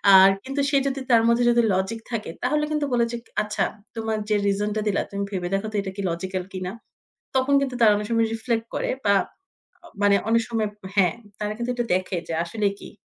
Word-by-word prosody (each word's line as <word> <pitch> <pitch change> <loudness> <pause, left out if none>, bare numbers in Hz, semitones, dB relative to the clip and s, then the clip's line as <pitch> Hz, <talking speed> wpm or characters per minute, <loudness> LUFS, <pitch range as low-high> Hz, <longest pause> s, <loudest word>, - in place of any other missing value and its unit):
আর 190 0 +9
কিন্তু 275 +2 -2
সে 280 - +3
যদি 275 0 -2
তার 230 -1 +7
মধ্যে 235 +1 +3
যদি 240 0 +4
লজিক 190 +5 -1
থাকে 225 -6 -3
তাহলে 300 +4 +1
কিন্তু 300 -1 0
বলে 235 -1 +3
যে 235 - -3 0.2
"আচ্ছা 210 0 -1 0.3
তোমার 220 -1 -1
যে 210 - +3
রিজন 200 +1 +1
টা 215 - 0
দিলা 200 - +2
তুমি 200 0 -2
ভেবে 180 -3 -2
দেখো 195 +2 0
তো - - -7
এটা 195 -1 -5
কি 200 - -4
লজিক্যাল 185 +2 -3
কিনা?" 185 -1 -4 0.6
তখন 260 +2 +2
কিন্তু 265 -2 -2
তারা 220 -2 +7
অনেক 210 0 -3
সময় 230 -1 +2
রিফ্লেক্ট 225 0 -1
করে - - -1 0.2
বা 200 0 +5 0.9
মানে 205 0 +5
অনেক 230 0 +4
সময় 225 -2 0 0.3
হ্যাঁ, 185 -4 +3 0.2
তারা 210 0 -2
কিন্তু 240 +1 -3
এটা 240 -1 -1
দেখে 185 0 -2
যে - - -3
আসলে 205 +4 0
কী? - - -10
215 Hz, 210 wpm, -24 LUFS, 195-235 Hz, 0.9 s, আর